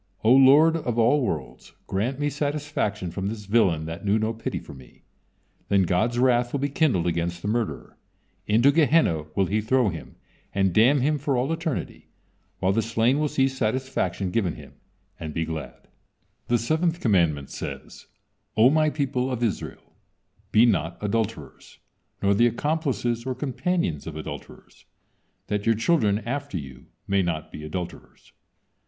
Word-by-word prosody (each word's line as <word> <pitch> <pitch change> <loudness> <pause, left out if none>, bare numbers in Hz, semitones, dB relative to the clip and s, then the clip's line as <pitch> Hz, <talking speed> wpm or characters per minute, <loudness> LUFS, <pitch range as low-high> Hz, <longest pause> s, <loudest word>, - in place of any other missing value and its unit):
O 115 +3 +6
Lord 140 +5 +6
of 120 -7 -3
all 120 +6 +4
worlds! 75 - -5
Grant 120 +8 -2
me 145 - 0
satisfaction 145 - -2
from 95 +2 -3
this 105 0 -5
villain 95 -7 +2
that 80 +4 -7
knew 105 +1 +2
no 110 +1 -1
pity 115 - -4
for - - -9
me." 65 -3 -16 0.7
Then 100 -1 +4
God's 110 +7 +1
wrath 120 -1 +3
will 140 - -1
be 140 +1 -1
kindled 135 - +1
against 85 0 -2
the - - -3
murderer, 115 0 -3 0.5
into 115 +6 +5
Gehenna 145 - +3
will 95 - +2
he 105 +4 0
throw 120 +1 +2
him 80 -3 -8 0.4
and 95 -2 +2
damn 125 +7 +4
him 150 +2 +1
for 140 -2 0
all 135 +6 0
eternity, 165 -4 -4 0.5
while 95 +1 +1
the 115 - +2
slain 115 +4 +1
will 150 - +1
see 135 -2 +2
satisfaction 125 -7 -2
given 95 -7 0
him, - - -13 0.5
and 80 -2 -6
be 80 - 0
glad. 80 -1 -7 0.6
The 120 - +3
seventh 160 +8 0
commandment 85 - +1
says: - - -8 0.5
"O 120 +4 +6
My 155 0 +3
people 135 -3 -1
of 120 -1 -2
Israel, 110 -5 -4 0.6
be 110 +3 +6
not 85 -7 0
adulterers, 105 - -4 0.5
nor 100 0 +4
the 120 +4 +4
accomplices 120 - -1
or 130 0 -3
companions 140 - -2
of 80 - -6
adulterers, 80 - -9 0.6
that 105 +1 -2
your 115 - +4
children 110 -4 +2
after 140 -4 -3
you 65 -3 -9 0.2
may 100 0 +2
not 80 -4 -3
be 75 - -8
adulterers. 85 +3 -8
115 Hz, 160 wpm, -25 LUFS, 95-135 Hz, 0.7 s, O